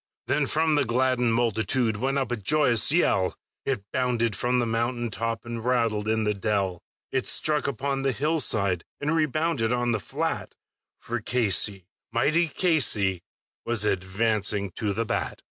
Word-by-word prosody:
Then 145 -2 +1
from 160 +2 +1
the 145 -1 +3
gladdened 125 -1 +1
multitude 115 0 0
went 135 +5 0
up 135 -2 -1
a - - +1
joyous 120 +3 +3
yell, 100 - +2 0.3
It 125 -8 -1
bounded 120 -4 0
from 125 +5 0
the 120 - +2
mountain 120 +1 -1
top, 115 +2 -3
and 115 -1 -5
rattled 115 -4 0
in 110 0 +1
the 105 0 +1
dell, 100 -3 -1 0.3
It 130 -1 -1
struck 150 -2 +2
upon 140 0 -2
the 135 0 +1
hillside, 115 - 0 0.2
and 150 +3 -1
rebounded 155 -5 0
on 120 -1 +1
the 110 - 0
flat; 85 - -4 0.4
For 120 +1 -4
Casey, 105 -5 +1 0.3
mighty 155 +9 +2
Casey, 110 - +2 0.4
was 115 -3 +1
advancing 100 +1 0
to 105 +3 -3
the 115 +3 -2
bat. - - -3
120 Hz, 155 wpm, -26 LUFS, 105-135 Hz, 0.4 s, the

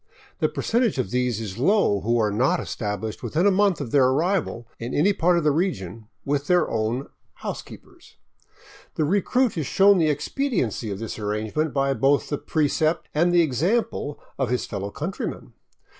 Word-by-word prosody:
The - - +2
percentage 235 - 0
of 115 -7 -2
these 125 -3 0
is 105 -2 -6
low 145 - +3
who 115 +4 +1
are 105 -2 +1
not 130 - +2
established 105 0 -4
within 165 +5 0
a 205 - +6
month 195 -1 +2
of 135 -6 -5
their 140 -3 +5
arrival 150 -4 0
in 120 +2 -4
any 190 +8 +3
part 180 -1 +2
of 170 - 0
the 150 - +3
region 115 - -2 0.2
with 145 0 -1
their 180 -1 +3
own 115 +4 -2
'' - - -45
housekeepers." - - -9 0.8
The 155 - +1
recruit 205 - +1
is 145 - -2
shown 195 0 +5
the 160 -2 +3
expediency 150 - -1
of 100 - -4
this 110 +1 -6
arrangement 110 +9 -2
by 135 0 +1
both 135 +1 +2
the 145 - -2
precept 155 +1 0
and 170 +3 +3
the 175 -1 +5
example 165 - -1 0.2
of 130 -4 0
his 125 0 0
fellow 100 +1 -4
countrymen. 155 - -5
145 Hz, 175 wpm, -24 LUFS, 115-175 Hz, 0.8 s, a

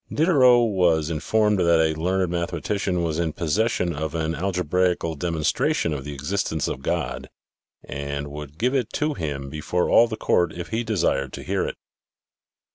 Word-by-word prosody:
Diderot 130 -7 +5
was 85 -5 +2
informed 105 +6 +1
that 85 -2 +4
a 80 -1 +3
learned 90 +3 0
mathematician 90 +2 -1
was 80 -1 -1
in 80 -3 -1
possession 90 +2 0
of 80 +2 -4
an 80 0 -1
al 95 +3 -1
gebraical 90 -1 0
demonstration 80 0 0
of 70 -1 -5
the 75 - -5
existence 80 +1 -2
of 65 - -4
God 65 -5 -3 0.5
and 70 0 -5
would 75 0 -9
give 125 +6 +1
it 125 -5 0
to 150 0 0
him 75 - -4
before 75 +5 -1
all 120 - +6
the 110 -1 -5
court 85 -5 +1
if 85 0 -7
he 115 +1 -1
desired 95 - 0
to - - -7
hear - - -1
it. - - -5
85 Hz, 170 wpm, -24 LUFS, 75-100 Hz, 0.5 s, all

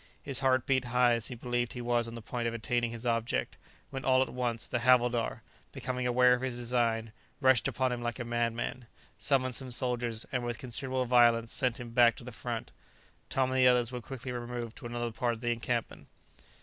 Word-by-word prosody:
His 135 -2 -2
heart 130 -2 +2
beat 130 -2 +1
high 125 0 +3
as 115 -1 -1
he 125 - -6
believed 120 0 -2
he 125 - -6
was 120 -1 +1
on 115 - -7
the 115 - -8
point 120 0 -3
of 115 - -2
attaining 120 +1 0
his 115 +1 -6
object, 115 - -1 0.4
when 135 0 -5
all 130 0 +4
at - - -7
once 120 -3 -1
the 120 - -1
havildar, 120 -1 +2 0.3
becoming 125 -1 -3
aware 125 0 +5
of 125 - 0
his 130 -2 -2
design, 115 -2 0 0.3
rushed 130 -2 +4
upon 130 -1 0
him 120 -1 -3
like 120 0 -3
a 120 - -4
madman, 120 +1 -2 0.3
summoned 130 -3 +2
some 130 +3 -3
soldiers, 120 -2 -1
and 125 -2 -1
with 120 -1 -3
considerable 130 +2 -1
violence 120 -2 +4
sent 125 -3 0
him 120 -1 -7
back 120 0 +5
to - - -10
the 125 - -8
front. 115 0 -5 0.6
Tom 130 -1 +1
and 130 - +1
the 130 - +6
others 125 -1 +3
were 125 -1 -5
quickly 130 +1 -7
removed 120 -1 -5
to 125 - -7
another 120 0 -3
part 120 +1 0
of 110 - -13
the 120 -1 0
encampment. 120 0 -3
120 Hz, 215 wpm, -30 LUFS, 115-125 Hz, 0.6 s, the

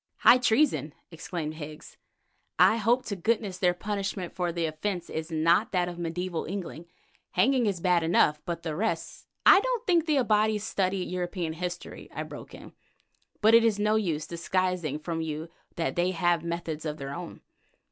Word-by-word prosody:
"High 250 - +7
treason!" 245 - +2 0.2
exclaimed 165 -1 -5
Higgs. 155 0 -9 0.6
"I 225 - +6
hope 235 +4 +2
to 200 - -3
goodness 200 -1 -1
their 180 -1 +3
punishment 195 -2 -3
for 180 -2 -1
the 170 -1 -1
offence 170 +4 -3
is 160 +1 -4
not 165 +6 +3
that 180 -1 +2
of 175 -1 -6
mediæval 175 0 -3
England; 175 -4 -5 0.5
hanging 260 -4 +3
is 195 -4 -1
bad 180 -1 +3
enough—but 165 0 +1
the 160 -2 -3
rest——!" 220 +7 -3 0.2
"I 385 - +9
don't - - -2
think 340 -4 +2
the 300 -2 +3
Abati 215 -3 +3
study 190 -2 -1
European 175 -2 -3
history," 175 +1 -6
I - - -2
broke - - -10
in; - - -12 0.7
"but 220 +1 +5
it 230 0 +8
is 225 -3 +2
no 210 +1 +2
use 165 -8 0
disguising 175 -3 -1
from 165 +1 -4
you 160 +1 -4 0.3
that 165 - -2
they 175 +1 +2
have 175 -2 +1
methods 170 -2 -4
of 155 -1 -4
their 140 -1 -6
own. 175 +1 -8
180 Hz, 170 wpm, -28 LUFS, 165-210 Hz, 0.7 s, I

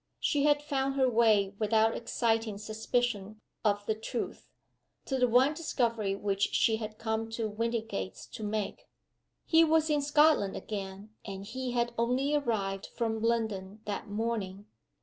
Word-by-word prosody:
She 290 -1 +1
had 295 0 +3
found 275 -2 -1
her 265 -1 +3
way 220 -4 +3
without 220 +1 +3
exciting 225 -2 0
suspicion 215 0 -2 0.2
of 205 -1 +1
the 220 - +1
truth, 225 +2 -5 0.6
to 265 -1 -1
the 250 - +4
one 255 +5 +4
discovery 230 -10 0
which 200 0 0
she 220 -1 +3
had 215 -1 -6
come 225 0 -2
to 225 -1 -1
Windygates 220 - -3
to 220 - -7
make. 210 -1 -3 0.6
He 325 0 +6
was 320 -1 +3
in 295 -1 +2
Scotland 295 -8 +4
again, 200 0 -6
and 195 -1 -7
he 250 +3 -4
had 240 -1 0
only 255 +5 +1
arrived 210 -9 -1
from 225 -2 -2
London 220 -3 -1
that 205 0 -4
morning. 205 -2 -3
225 Hz, 150 wpm, -30 LUFS, 205-250 Hz, 0.6 s, He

